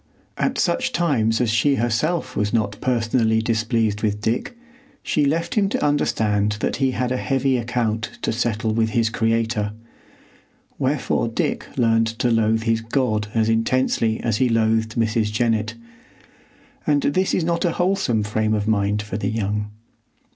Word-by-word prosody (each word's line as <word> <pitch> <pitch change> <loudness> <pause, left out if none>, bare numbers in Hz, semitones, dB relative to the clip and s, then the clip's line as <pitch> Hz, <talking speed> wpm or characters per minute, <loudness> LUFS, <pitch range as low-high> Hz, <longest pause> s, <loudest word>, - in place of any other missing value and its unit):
At 270 - -1
such 170 -2 0
times 115 -10 +1
as 120 -3 +1
she 140 +5 +3
herself 120 +9 -1
was 105 0 0
not 105 -3 0
personally 115 -2 +1
displeased 110 -1 0
with 105 -1 0
Dick, 115 - -2 0.5
she 150 - +1
left 165 +4 0
him 200 -3 +2
to - - -1
understand 105 -8 +1
that 105 - -2
he 135 -1 +2
had 125 0 -1
a 130 - 0
heavy 135 0 +1
account 115 -2 -2
to - - +1
settle 110 -1 -1
with 110 0 +1
his 115 -1 +2
Creator; 115 -1 0 1.1
wherefore - - 0
Dick - - -2
learned 115 -1 +3
to 120 0 +1
loathe 110 0 +2
his 115 -1 +1
God 115 -3 -1
as 110 -1 +2
intensely 115 0 +1
as 115 -3 0
he 125 +1 +2
loathed 110 -1 +1
Mrs. 110 -2 +1
Jennett; 110 -1 0 1.1
and 145 -2 +2
this 185 +6 +1
is 180 - 0
not 170 +1 0
a 170 -3 +1
wholesome 175 - +1
frame 110 +1 0
of 105 0 -2
mind 105 -1 +1
for 105 -2 -5
the 110 - -2
young. 105 -1 -2
115 Hz, 160 wpm, -22 LUFS, 110-130 Hz, 1.1 s, she